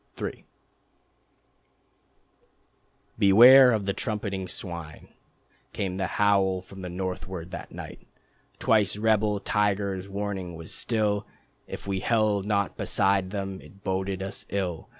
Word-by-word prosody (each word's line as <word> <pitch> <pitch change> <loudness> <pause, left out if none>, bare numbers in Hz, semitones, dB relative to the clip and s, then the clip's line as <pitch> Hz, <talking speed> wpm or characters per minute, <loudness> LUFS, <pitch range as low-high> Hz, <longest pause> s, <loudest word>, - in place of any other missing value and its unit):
III - - -5 2.7
"Beware 125 +6 +8
of 110 -4 0
the 100 - 0
trumpeting 100 -5 -3
swine," 85 -4 -7 0.6
Came 95 -2 -3
the 95 -1 -1
howl 100 -2 +3
from 95 +1 -12
the 90 - -5
northward 90 -1 -5
that 95 - -7
night. - - -10 0.5
Twice 105 -3 +2
rebel 105 -1 +2
tigers 100 -2 -1
warning 100 -3 -4
was 80 0 -6
still 105 -3 0 0.4
If - - -8
we 100 -1 -2
held 105 -2 +1
not 100 -2 0
beside 95 -1 +1
them 95 -1 -5
it 100 +1 -17
boded 95 0 -2
us 100 +1 -5
ill. 90 -5 -3
100 Hz, 120 wpm, -26 LUFS, 95-105 Hz, 2.7 s, Beware